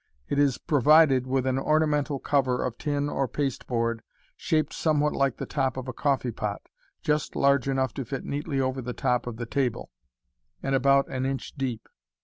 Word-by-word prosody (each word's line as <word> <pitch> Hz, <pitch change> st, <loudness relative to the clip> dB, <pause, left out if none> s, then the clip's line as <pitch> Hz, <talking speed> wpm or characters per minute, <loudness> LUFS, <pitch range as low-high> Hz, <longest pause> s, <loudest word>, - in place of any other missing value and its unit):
It 145 Hz, -, 0 dB
is 140 Hz, -3 st, +3 dB
provided 145 Hz, -2 st, +4 dB
with 130 Hz, 0 st, 0 dB
an 130 Hz, 0 st, +1 dB
ornamental 150 Hz, -1 st, +1 dB
cover 130 Hz, -2 st, +1 dB
of 125 Hz, -2 st, -4 dB
tin 145 Hz, -1 st, -1 dB
or 135 Hz, -2 st, -1 dB
pasteboard, 115 Hz, -5 st, -2 dB, 0.3 s
shaped 155 Hz, -5 st, 0 dB
somewhat 150 Hz, -2 st, +1 dB
like 135 Hz, -3 st, +1 dB
the -, -, -4 dB
top 135 Hz, -3 st, -1 dB
of 130 Hz, 0 st, -5 dB
a 130 Hz, -, -4 dB
coffee 135 Hz, -3 st, 0 dB
pot, 105 Hz, -2 st, -4 dB, 0.4 s
just 150 Hz, 0 st, 0 dB
large 140 Hz, -1 st, +3 dB
enough 130 Hz, -2 st, 0 dB
to 135 Hz, -, -4 dB
fit 135 Hz, +3 st, -5 dB
neatly 145 Hz, 0 st, -2 dB
over 130 Hz, 0 st, -1 dB
the 125 Hz, 0 st, -5 dB
top 125 Hz, 0 st, 0 dB
of 115 Hz, -2 st, -5 dB
the 120 Hz, -, -4 dB
table, 125 Hz, 0 st, -2 dB, 0.7 s
and 135 Hz, -, -1 dB
about 140 Hz, +1 st, +4 dB
*n 130 Hz, 0 st, -2 dB
inch 135 Hz, 0 st, -4 dB
deep. 125 Hz, -5 st, -3 dB
135 Hz, 180 wpm, -26 LUFS, 125-145 Hz, 0.7 s, provided